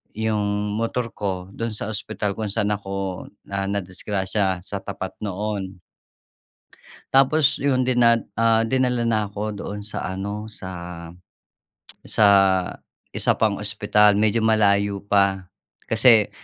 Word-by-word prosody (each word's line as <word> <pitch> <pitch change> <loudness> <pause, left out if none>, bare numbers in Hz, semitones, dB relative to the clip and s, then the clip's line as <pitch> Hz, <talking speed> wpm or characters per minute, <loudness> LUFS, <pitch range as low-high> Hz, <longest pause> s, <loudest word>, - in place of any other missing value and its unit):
'yong 105 -1 -1
motor 115 +1 -2
ko, 95 -2 -3
do'n 115 0 -3
sa 105 - -5
ospital 105 -1 -3
kung 105 -2 -3
sa'n 105 -1 0
ako, 95 -2 -5 0.2
ah, 100 0 -2
nadisgrasya, 95 0 -1
sa 100 +2 -7
tapat 95 -1 -6
noon. 100 -2 -4 1.3
Tapos 140 +2 +4
iyon, 130 -3 +2
dina 120 -2 +4 0.2
ah, 115 0 +3
dinala 125 -1 +1
na 110 -3 0
'ko 105 +1 -4
doon 100 0 -6
sa 105 - -5
ano, 100 +3 -4
sa 95 -3 -8 1.4
sa 105 - +3 0.8
isa - - +1
pang 105 -3 +1
ospital, 105 0 +3
medyo 110 +2 +2
malayo 100 -2 +2
pa. 100 -2 +1 0.4
Kasi 115 -2 +5
105 Hz, 120 wpm, -23 LUFS, 100-110 Hz, 1.4 s, Kasi